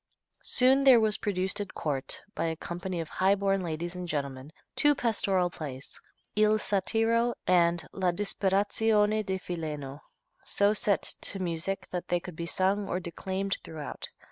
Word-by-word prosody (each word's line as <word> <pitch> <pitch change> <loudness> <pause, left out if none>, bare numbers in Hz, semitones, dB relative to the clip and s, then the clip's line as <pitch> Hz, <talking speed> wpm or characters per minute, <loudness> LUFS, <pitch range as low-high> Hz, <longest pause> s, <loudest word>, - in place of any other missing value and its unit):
Soon 265 +2 +4
there 260 -3 +8
was 215 -1 +3
produced 190 -1 -1
at 200 - -7
court, 135 -3 -2
by 165 - -2
a 165 0 -1
company 175 +2 -5
of 165 - -3
highborn 195 +1 +1
ladies 170 0 -4
and 180 -1 -6
gentlemen, 140 -2 -4 0.2
two 295 0 +5
pastoral 195 -7 +1
plays: 140 -5 -8 0.3
"Il 215 0 +4
Satiro" 225 +3 +1
and 170 -3 +3
"La 185 -2 0
Disperazione 210 +3 +1
di 190 -1 -2
Fileno," 150 -6 -5 0.4
so 200 +1 +3
set 205 -2 +1
to 200 - +1
music 185 +1 -3
that 180 -1 -4
they 175 - +1
could 175 -1 -9
be 170 +1 -4
sung 195 +3 0
or 180 - -1
declaimed 190 +3 -3
throughout. 155 -3 -7
190 Hz, 150 wpm, -29 LUFS, 170-205 Hz, 0.4 s, there